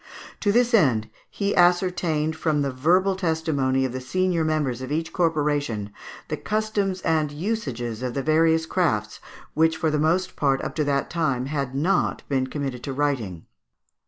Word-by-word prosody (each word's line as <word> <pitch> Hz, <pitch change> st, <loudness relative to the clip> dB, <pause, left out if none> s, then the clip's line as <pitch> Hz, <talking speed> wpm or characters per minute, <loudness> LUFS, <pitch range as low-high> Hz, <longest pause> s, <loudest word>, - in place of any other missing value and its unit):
To 205 Hz, -, +2 dB
this 240 Hz, +2 st, +2 dB
end 120 Hz, -, +3 dB, 0.2 s
he 200 Hz, 0 st, -1 dB
ascertained 175 Hz, -3 st, +2 dB
from 155 Hz, -2 st, 0 dB
the 140 Hz, -, -1 dB
verbal 180 Hz, +9 st, +2 dB
testimony 160 Hz, -7 st, 0 dB
of 130 Hz, -, -2 dB
the 130 Hz, +1 st, -5 dB
senior 180 Hz, +5 st, 0 dB
members 150 Hz, -6 st, -1 dB
of 130 Hz, +1 st, -6 dB
each 160 Hz, +2 st, -2 dB
corporation 145 Hz, -, 0 dB, 0.3 s
the -, -, -3 dB
customs 210 Hz, -3 st, -1 dB
and 155 Hz, -2 st, +1 dB
usages 140 Hz, -, -3 dB
of 125 Hz, -2 st, -3 dB
the 135 Hz, -, -1 dB
various 160 Hz, +1 st, +3 dB
crafts, 110 Hz, -, -1 dB, 0.3 s
which 160 Hz, +1 st, +2 dB
for 160 Hz, -1 st, 0 dB
the 150 Hz, -, 0 dB
most 175 Hz, +5 st, +1 dB
part 135 Hz, -2 st, +1 dB
up -, -, -4 dB
to 155 Hz, -, +2 dB
that 140 Hz, -1 st, 0 dB
time 140 Hz, -7 st, 0 dB
had 140 Hz, -2 st, -3 dB
not 180 Hz, +7 st, +1 dB
been 130 Hz, -2 st, 0 dB
committed 135 Hz, -3 st, -4 dB
to 135 Hz, -, -3 dB
writing. 130 Hz, -, -2 dB
155 Hz, 165 wpm, -24 LUFS, 130-175 Hz, 0.3 s, end